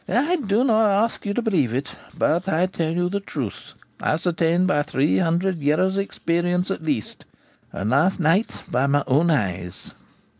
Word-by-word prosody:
' - - -16 0.2
I 360 - +2
do 220 -4 +1
not 220 -4 +3
ask 205 +2 0
you 200 - -1
to 245 - -1
believe 155 - +1
it; 135 +3 -4 0.2
but 175 +4 +1
I 170 +1 +2
tell 170 -3 -2
you 175 +1 0
the 200 +3 -2
truth, 140 - -6 0.3
ascertained 170 +2 +1
by 145 -6 +2
three 145 0 +1
hundred 175 +1 0
years' 155 +7 +1
experience 180 -1 -1
at 195 - -3
least, 140 -9 -3 0.5
and 100 +3 -3
last 160 +10 +2
night 175 +7 +1
by 130 +3 0
my 145 0 +2
own 150 +6 +2
eyes.' 95 - -2
170 Hz, 175 wpm, -22 LUFS, 145-195 Hz, 0.5 s, not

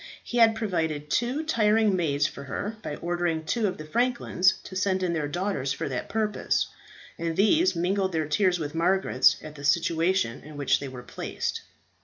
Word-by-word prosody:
He 240 - -2
had 225 -1 +6
provided 160 -9 -2
two 250 +6 0
tiring 215 -7 +3
maids 145 -5 +1
for 140 0 -5
her 210 +10 -4
by 150 - -5
ordering 170 -1 -2
two 225 +4 +1
of 185 - -3
the 155 - -8
franklins 230 -2 +2
to 185 - -9
send 190 0 0
in 175 -2 0
their 155 -3 -1
daughters 155 -4 -1
for - - -4
that 125 -2 -4
purpose, 215 -1 0 0.5
and 165 -1 -2
these 320 - +4
mingled 190 +3 0
their 160 -3 -1
tears 180 +4 +2
with 150 -3 -4
Margaret's 170 -5 +3
at 155 - -8
the 145 -1 -11
situation 165 -2 +1
in 150 +1 -11
which 140 -2 +2
they 140 - -5
were 130 -2 -8
placed. - - -4
175 Hz, 185 wpm, -26 LUFS, 150-205 Hz, 0.5 s, had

